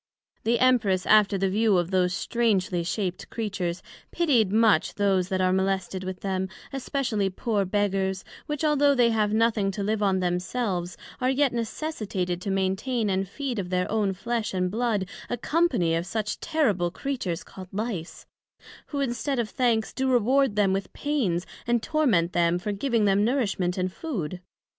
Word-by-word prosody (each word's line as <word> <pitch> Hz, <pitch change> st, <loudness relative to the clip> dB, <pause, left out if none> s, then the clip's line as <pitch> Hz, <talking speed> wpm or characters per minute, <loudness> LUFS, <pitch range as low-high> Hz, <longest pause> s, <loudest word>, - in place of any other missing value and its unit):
The 235 Hz, +1 st, +3 dB
Empress, 220 Hz, -7 st, +3 dB
after 210 Hz, -2 st, +5 dB
the 195 Hz, +1 st, +1 dB
view 215 Hz, -1 st, +3 dB
of 175 Hz, +1 st, 0 dB
those 180 Hz, -1 st, +2 dB
strangely 190 Hz, -4 st, 0 dB
shaped 185 Hz, +1 st, -3 dB
Creatures, 190 Hz, -6 st, -3 dB, 0.3 s
pitied 250 Hz, -, +2 dB
much 215 Hz, -6 st, +3 dB
those 190 Hz, -3 st, +1 dB
that 185 Hz, -1 st, 0 dB
are 185 Hz, 0 st, +3 dB
molested 190 Hz, 0 st, -1 dB
with 185 Hz, 0 st, -6 dB
them, 190 Hz, -1 st, -2 dB, 0.2 s
especially 250 Hz, -7 st, -1 dB
poor 200 Hz, +1 st, -1 dB
Beggars, 190 Hz, -1 st, 0 dB, 0.2 s
which 295 Hz, 0 st, -3 dB
although 290 Hz, -1 st, +4 dB
they 240 Hz, -2 st, +4 dB
have 215 Hz, -2 st, +1 dB
nothing 220 Hz, -2 st, +2 dB
to 200 Hz, +1 st, -3 dB
live 215 Hz, +1 st, 0 dB
on 195 Hz, -2 st, +2 dB
themselves, 180 Hz, 0 st, -2 dB, 0.2 s
are 255 Hz, 0 st, +1 dB
yet 270 Hz, -1 st, +2 dB
necessitated 215 Hz, -, -3 dB
to 200 Hz, -, -4 dB
maintain 195 Hz, +4 st, 0 dB
and 190 Hz, 0 st, -1 dB
feed 265 Hz, -2 st, -3 dB
of 180 Hz, -2 st, -4 dB
their 180 Hz, 0 st, 0 dB
own 210 Hz, -3 st, +1 dB
flesh 225 Hz, +1 st, -3 dB
and 180 Hz, -1 st, 0 dB
blood, 220 Hz, -4 st, 0 dB, 0.2 s
a 245 Hz, -, -1 dB
company 250 Hz, -, +1 dB
of 165 Hz, +2 st, -1 dB
such 210 Hz, +1 st, -2 dB
terrible 230 Hz, -, +1 dB
Creatures 190 Hz, -5 st, -3 dB
called 185 Hz, -1 st, -11 dB
Lice; 200 Hz, -5 st, -4 dB, 0.6 s
who, 285 Hz, -2 st, -3 dB
instead 270 Hz, +1 st, -1 dB
of 230 Hz, -3 st, -1 dB
thanks, 230 Hz, -3 st, +1 dB
do 265 Hz, 0 st, 0 dB
reward 255 Hz, 0 st, +3 dB
them 200 Hz, -2 st, +3 dB
with 195 Hz, -1 st, -3 dB
pains, 220 Hz, -, -1 dB, 0.2 s
and 240 Hz, -1 st, +1 dB
torment 225 Hz, -, +2 dB
them 170 Hz, 0 st, +2 dB
for 195 Hz, +4 st, -3 dB
giving 225 Hz, +1 st, +1 dB
them 200 Hz, 0 st, +3 dB
nourishment 205 Hz, -7 st, 0 dB
and 185 Hz, 0 st, -1 dB
food. 185 Hz, -, -4 dB
205 Hz, 165 wpm, -26 LUFS, 185-240 Hz, 0.6 s, after